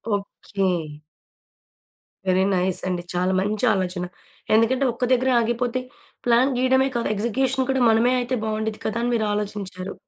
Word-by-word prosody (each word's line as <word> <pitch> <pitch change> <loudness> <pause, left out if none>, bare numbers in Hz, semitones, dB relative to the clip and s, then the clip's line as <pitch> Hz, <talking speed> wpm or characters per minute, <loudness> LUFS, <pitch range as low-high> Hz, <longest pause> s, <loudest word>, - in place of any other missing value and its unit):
Okay. 200 0 -3 1.6
Very 185 +1 +3
nice 180 0 +2
అండి! 180 -1 -2
చాలా 180 +1 +1
మంచి 210 +4 -1
ఆలోచన. 180 -1 -2 0.5
ఎందుకంటే 250 +4 +3
ఒక 250 - -1
దగ్గర 255 +1 +2
ఆగిపోతే 240 +2 -1 0.5
ప్లాన్ 245 +3 +3
గీయడమే 260 +1 +3
కాదు 235 - -1
ఎగ్జిక్యూషన్ 255 +4 0
కూడా 265 -1 0
మనమే 230 +3 +3
అయితే 250 +1 -2
బాగుండేది 220 0 -3
కదా! 220 - -2
అని 245 - 0
మీరు 220 -2 0
ఆలోచించారు. 200 -2 -4
220 Hz, 135 wpm, -23 LUFS, 195-250 Hz, 1.6 s, Very